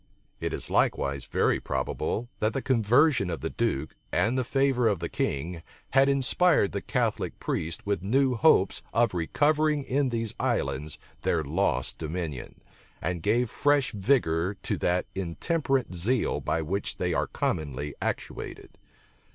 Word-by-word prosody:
It - - -2
is - - -5
likewise 70 -1 +1
very - - +1
probable, 65 - -2
that 110 +1 +1
the 135 - -1
conversion 125 - +3
of 85 - -4
the 80 - -3
duke, 115 -13 -1 0.2
and 115 +3 +2
the 130 - +1
favor 135 -1 +2
of 105 -3 +2
the 85 +1 -3
king, 80 +5 -2 0.3
had 135 +1 +5
inspired 140 - +3
the - - -3
Catholic - - -1
priests 80 +1 -3
with 100 -2 0
new 130 +7 +2
hopes 115 -5 +4
of 120 -2 +3
recovering 150 - +2
in 135 +1 +1
these 115 -2 -2
islands 70 +3 -1 0.2
their 80 -2 +1
lost 85 +8 0
dominion, 80 -5 -5 0.4
and 85 +1 -2
gave 115 +5 +1
fresh 145 -2 +2
vigor 95 -5 +1
to - - -1
that 90 +1 +1
intemperate 130 - -1
zeal 110 +8 +1
by 80 - -1
which 95 +6 -3
they - - 0
are - - 0
commonly 75 -2 -2
actuated. - - -5
105 Hz, 145 wpm, -27 LUFS, 80-130 Hz, 0.4 s, had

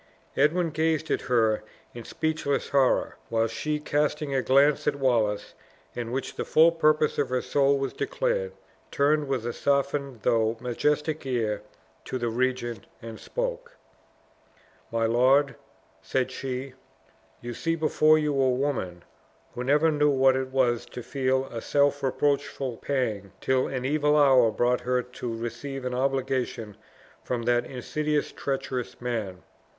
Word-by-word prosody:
Edwin 165 +4 +2
gazed 160 0 0
at - - +1
her 110 -3 +2 0.3
in 120 - -8
speechless 155 -3 -2
horror; 135 -2 +2
while 115 0 +2
she, 150 +7 -2
casting 150 -1 -1
a 135 - +2
glance 140 +3 +3
at 140 - +2
Wallace, 115 -7 0 0.4
in 120 -1 -5
which 135 +2 -3
the - - -3
full 160 +2 +5
purpose 155 -2 +2
of 140 - 0
her 125 0 -1
soul 140 0 +2
was 135 0 -3
declared, - - -1 0.4
turned 145 +1 +2
with 130 -4 -2
a 120 - -2
softened 140 -3 -1
though 115 -1 +2
majestic 150 +5 -1
air, 110 -5 -1 0.4
to 130 - -3
the 120 -2 -1
regent, 120 -2 -2
and 115 -1 -9
spoke: - - -4 1.1
"My 115 0 +1
lord," 130 +4 +3 0.5
said 130 -1 -1
she, 130 0 -5 0.7
"you 120 0 -6
see 165 +8 -1
before 155 -1 +4
you 150 -1 0
a 135 -1 +2
woman, 125 -10 -2 0.5
who 125 - -4
never 150 +5 +3
knew 150 -1 +3
what 135 -1 +4
it 130 0 -1
was 130 -3 +1
to 125 - -8
feel 130 0 0
a 115 - -5
self 145 0 +2
reproachful 140 -2 -1
pang 110 -9 -2
till 130 0 +1
an 130 -1 -4
evil 150 +1 +2
hour 130 -5 +6
brought 120 +3 +1
her 125 0 0
to 125 -2 -6
receive 135 +3 -5
an 125 - -2
obligation 130 -4 -1 0.5
from 120 -2 -3
that 120 0 +1
insidious 150 +4 -2
treacherous 135 -3 -4
man. 110 -7 -4
130 Hz, 145 wpm, -26 LUFS, 120-145 Hz, 1.1 s, hour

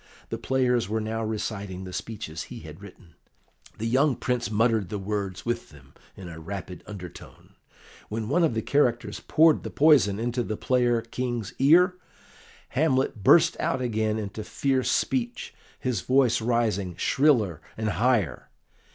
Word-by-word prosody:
The - - -4
players 125 -5 +1
were 110 +1 0
now 110 +1 -3
reciting 100 -3 -4
the 90 -1 -8
speeches 100 -6 -6
he - - -8
had 80 +3 -11
written; 95 -4 -14 0.6
the 110 - -4
young 130 +4 +3
Prince 125 -2 -2
muttered 110 -3 +1
the 105 - -3
words 100 -2 -4
with 120 0 -2
them 70 -3 -18 0.2
in 95 - -9
a 80 -1 -9
rapid 90 +1 -7
undertone. 90 -5 -11 0.6
When 110 0 -3
one 170 +8 +2
of 155 -8 +2
the 110 - -1
characters 125 -5 +1
poured 160 -1 +4
the - - -6
poison 140 -10 +4
into 120 +2 -1
the 110 -2 -3
player 120 -2 +1
King's 120 -1 -4
ear, 180 +7 +5 0.7
Hamlet 130 -6 +1
burst 165 - +6
out 130 - 0
again 110 -3 -1
into 105 0 -5
fierce 130 +3 0
speech, 120 -2 -1 0.3
his 120 -7 -1
voice 130 -1 +3
rising 110 -6 0
shriller 115 - +2 0.2
and 110 -1 -1
higher. 110 - 0
115 Hz, 150 wpm, -26 LUFS, 100-130 Hz, 0.7 s, burst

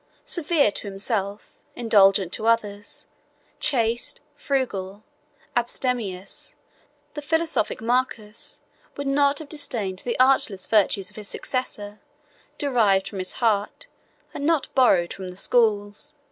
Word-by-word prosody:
Severe 310 - +2
to 205 - -6
himself, 200 0 -2 0.2
indulgent 195 -5 +4
to 220 - -1
others, 205 -3 0 0.5
chaste, 235 -3 +1
frugal, 210 -7 -2 0.5
abstemious, 235 -6 -1 0.6
the 295 - -5
philosophic 320 -7 0
Marcus 230 -3 -2 0.4
would 285 - -3
not 280 +1 +3
have 315 - -6
disdained 230 - -3
the 240 +3 -3
artless 255 -7 +3
virtues 200 -2 +2
of - - -19
his 210 -1 -7
successor, 210 -6 -4 0.6
derived 220 -9 +2
from 200 - -6
his 185 0 -2
heart, 220 - 0 0.5
and - - -5
not 315 -1 +1
borrowed 190 -10 +4
from 190 -1 -7
the 180 0 -9
schools. 215 +4 +1
225 Hz, 120 wpm, -24 LUFS, 200-265 Hz, 0.6 s, indulgent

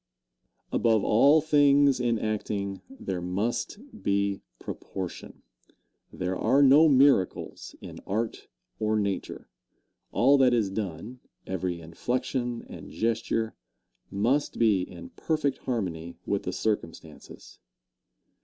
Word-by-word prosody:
Answer. - - 0
Above 110 -3 +3
all 140 +8 +5
things 145 -3 +4
in 120 -2 +1
acting, 105 -2 -3
there 95 - -5
must 100 - -2 0.2
be 100 0 0 0.2
proportion. 95 -3 -7 0.7
There 90 0 -3
are 130 +9 +3
no 145 +4 +7
miracles 135 -8 +2
in - - -9
art 110 +3 -3 0.3
or 110 0 +1
nature. 100 -2 -3 0.6
All 140 +3 +4
that 125 -2 +5
is 105 -5 0
done 105 +4 -5 0.3
every 90 -2 -3
inflection 120 +8 -3
and - - -10
gesture 115 0 -1 0.6
must 120 +9 0
be 110 -5 +3
in 260 - -8
perfect 155 - -1
harmony 85 -8 -4
with 100 - -1
the 90 - -1
circumstances. 80 - -5
110 Hz, 110 wpm, -27 LUFS, 95-130 Hz, 0.7 s, no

